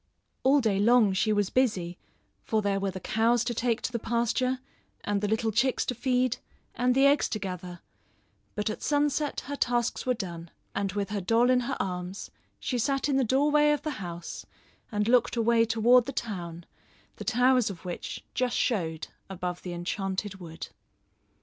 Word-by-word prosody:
All 275 +2 +4
day 210 -5 +1
long 220 -1 +5
she 205 +3 +1
was 205 -2 +1
busy 185 -9 0 0.4
for 215 -1 0
there 200 -1 +1
were 195 0 -1
the 190 0 -6
cows 225 +3 +2
to 240 - -2
take 230 0 0
to - - -2
the 235 - -2
pasture, 240 +3 0 0.5
and 205 -1 0
the 210 - 0
little 220 +1 0
chicks 250 +4 +1
to - - -1
feed, 250 0 +1 0.4
and 250 +1 +1
the 270 +1 +5
eggs 285 +1 +4
to - - -2
gather; 180 -3 -6 0.7
but 210 +1 -1
at - - -7
sunset 295 0 0
her 285 - -5
tasks 240 -3 0
were 250 - +3
done, 170 -6 -6 0.2
and 195 -1 -2
with 200 0 -2
her 205 -2 -1
doll 230 +6 +3
in 255 - +4
her 240 - -2
arms 180 +1 -4 0.3
she 250 - -2
sat 275 +4 0
in 275 - +2
the 270 - +3
doorway 295 +5 +3
of 295 -1 +1
the 305 - -2
house 170 -1 -6 0.5
and 210 -1 0
looked 245 0 +3
away 230 0 +3
toward 230 +2 +4
the - - -2
town, 175 -6 -5 0.5
the - - -6
towers 250 -1 +3
of 185 -2 -9
which 175 - -5
just 250 -1 0
showed 165 -9 -1 0.2
above 180 -2 -4
the 180 - -6
Enchanted 190 +3 -3
Wood. 165 -3 -8
225 Hz, 180 wpm, -28 LUFS, 190-250 Hz, 0.7 s, long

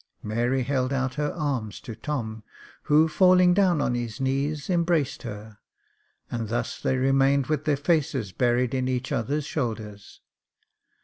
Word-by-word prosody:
Mary 120 +5 0
held 130 0 0
out 130 -1 -1
her 150 +1 -1
arms 135 - -3
to 115 - -8
Tom, 110 -3 -4 0.4
who 155 +1 +5
falling 180 +1 +5
down 185 -4 +3
on 125 - 0
his 120 0 -4
knees, 140 +3 -1
embraced 165 -6 +1
her, 105 -3 -8 0.7
and 115 -3 -3
thus 120 +1 -3
they 130 - +1
remained 135 +1 +3
with 150 0 -2
their 150 -2 +2
faces 140 - 0
buried 120 +3 +1
in 130 -1 0
each 130 0 -2
other's 140 +6 -1
shoulders. 110 -8 -5
135 Hz, 145 wpm, -25 LUFS, 120-150 Hz, 0.7 s, who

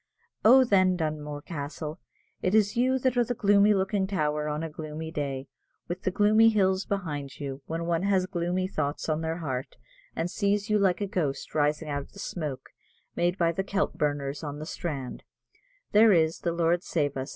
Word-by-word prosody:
Oh, 260 +4 +8
then, 185 -6 +3
Dunmore 150 -2 -3
Castle, 155 +1 -6 0.4
it 185 +3 +1
is 210 -2 +3
you 255 +2 +2
that 255 -1 0
are 240 - +5
the 245 +1 -3
gloomy 205 0 +4
looking 190 0 0
tower 150 -5 -1
on 150 +2 -2
a - - -2
gloomy 155 +1 -6
day, 140 -3 -3 0.4
with 175 +2 -4
the - - 0
gloomy 215 +4 +5
hills 190 -3 +2
behind 150 -9 -4
you; 140 -1 -5
when 165 +1 -3
one 170 0 0
has 190 -1 +2
gloomy 180 0 -1
thoughts 145 -6 -3
on 155 0 0
their 160 0 -2
heart, 135 -6 -4 0.4
and 170 +2 -2
sees 205 0 0
you 210 - +4
like 195 -1 +2
a - - +1
ghost 155 -8 -2
rising 150 +1 +1
out 145 -1 -2
of - - -14
the 200 - -12
smoke 155 -8 -5 0.5
made 175 +2 +1
by 170 -2 +2
the 190 +3 -2
kelp 195 +1 -1
burners 145 0 -2
on 145 -1 -5
the 155 - -6
strand, 145 -6 -5 0.7
there 215 +1 +7
is, 165 -2 +3
the 170 - -1
Lord 170 +1 +1
save 145 -6 -1
us! 135 +1 -4
170 Hz, 195 wpm, -27 LUFS, 150-200 Hz, 0.7 s, Oh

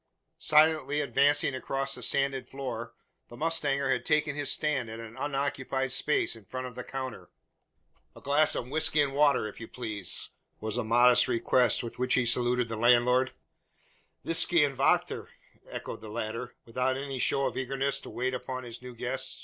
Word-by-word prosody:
Silently 150 -2 +3
advancing 140 +1 +2
across 135 +1 -2
the - - -5
sanded 135 -2 -1
floor, 120 -4 -6 0.3
the 120 - -12
mustanger 145 -3 0
had - - 0
taken 150 -1 +1
his 145 -1 -1
stand 140 -6 -1
at 110 +1 -7
an 115 0 -9
unoccupied 135 -2 -2
space 150 -1 +1
in 110 - -14
front 130 +6 -6
of 125 - -7
the 125 +1 -7
counter. 130 -2 -6 0.9
"A - - -12
glass 145 +2 +3
of 120 - -3
whisky 155 +2 +2
and 140 -2 +2
water, 140 -5 +3
if 105 - -10
you 115 - -8
please?" 110 -7 -3 0.3
was 110 +1 -2
the 125 - 0
modest 120 +2 +5
request 125 +1 +3
with 115 - -8
which 125 0 +2
to 125 - +2
saluted 120 0 +3
the 115 -1 -5
landlord. 125 +2 +3 0.9
"Visky 165 -1 +4
und 140 -1 -4
vachter!" 135 +2 +1 0.4
echoed - - -7
the 110 - -9
latter, 115 +2 -5
without 125 +3 -1
any 135 -1 -5
show 135 +2 +1
of 125 -3 -2
eagerness 135 +1 -1
to - - -10
wait 130 +1 -2
upon 130 0 -5
his 120 -1 -8
new 125 -1 -10
guest. 125 +3 -4
130 Hz, 175 wpm, -29 LUFS, 120-140 Hz, 0.9 s, modest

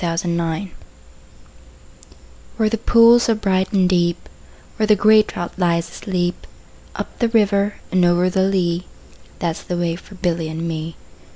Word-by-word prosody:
A - - 0
Boy's - - +1
Song 170 +1 -3 1.9
WHERE 220 -2 +2
the 225 - -1
pools 235 +1 +5
are 225 - +3
bright 190 -3 0
and 190 -3 +3
deep, 175 -1 0 0.5
Where 215 -1 0
the 210 - +5
grey 215 +2 +5
trout 175 -4 -6
lies 170 -2 0
asleep, 180 -2 -3 0.5
Up - - -7
the 235 - +1
river 205 -2 +1 0.2
and 185 -1 +2
over 175 +1 +3
the 190 +1 0
lea, 180 -2 0 0.5
That 165 -2 -2
's - - -10
the 175 - -4
way 170 -1 -1
for 195 +3 -14
Billy 170 -3 -2
and 160 +1 -4
me. 160 0 -5
180 Hz, 165 wpm, -19 LUFS, 170-205 Hz, 1.9 s, pools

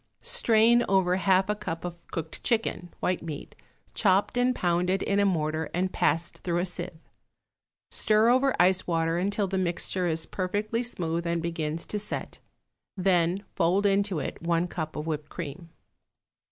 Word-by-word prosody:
Strain 230 +1 +4
over 185 -2 +3
half 190 0 +3
a 210 - +1
cup 175 -5 -5
of 175 -1 -6
cooked 160 -1 -6
chicken 220 -6 0
(white 180 0 0
meat), 155 -3 -7 0.4
chopped 195 0 +2
and 250 +1 +2
pounded 180 +1 +1
in 200 0 +1
a 200 - +4
mortar 155 -3 -1
and 185 +1 0
passed 165 +3 0
through 170 -1 -1
a 175 - +1
sieve. 175 -2 -4 0.9
Stir 215 +1 +4
over 260 +2 +3
ice 185 +1 +4
water 165 0 +1
until 200 +2 0
the 190 0 -1
mixture 180 0 0
is 160 -1 0
perfectly 205 +5 -2
smooth 170 -8 -2
and 170 0 0
begins 165 -1 -3
to 210 - -3
set, 210 - -5 0.6
then 180 0 +2
fold 190 +3 +2
into 200 -2 +2
it - - -4
one 170 +1 +1
cup 160 -3 -5
of 150 - -4
whipped 155 -2 -3
cream. 170 +1 -7
180 Hz, 160 wpm, -27 LUFS, 165-200 Hz, 0.9 s, Strain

